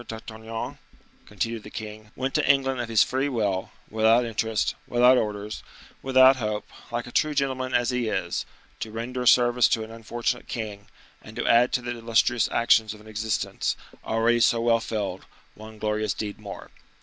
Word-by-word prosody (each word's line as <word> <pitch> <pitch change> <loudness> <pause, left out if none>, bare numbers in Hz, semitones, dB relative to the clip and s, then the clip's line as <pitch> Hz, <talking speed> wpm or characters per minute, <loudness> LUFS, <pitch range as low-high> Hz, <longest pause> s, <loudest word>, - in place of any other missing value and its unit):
d'Artagnan," 110 0 -7 0.5
continued 115 +2 -3
the 105 - -11
king, 110 0 -8
"went 130 +1 -2
to - - +1
England 135 -2 +3
of 120 - -5
his 110 -2 +5
free 135 +2 -1
will, 105 -7 -1 0.2
without 110 +2 +3
interest, 110 -2 -1
without 125 +1 +5
orders, 105 -2 -2 0.4
without 130 0 +6
hope, 105 -3 -3 0.2
like 120 0 -2
a 125 - -10
true 155 +2 +1
gentleman 130 -2 -1
as 120 0 +2
he 125 -2 -1
is, 90 -5 -2 0.4
to 110 - -4
render 120 +3 -4
a 125 - -1
service 120 0 +5
to 110 - 0
an 110 - -10
unfortunate 120 +2 -3
king, 105 -3 -6 0.3
and - - -13
to - - -3
add 120 +2 +5
to 125 - 0
the 120 - -3
illustrious 115 0 +2
actions 110 -2 +3
of - - -15
an 110 - -16
existence, 110 0 -2 0.3
already 115 +1 +2
so 115 0 +4
well 115 0 +3
filled, 105 -5 -4 0.3
one 110 +1 -12
glorious 105 -1 -1
deed 105 -1 -5
more." 100 -2 -9
115 Hz, 175 wpm, -25 LUFS, 110-125 Hz, 0.5 s, without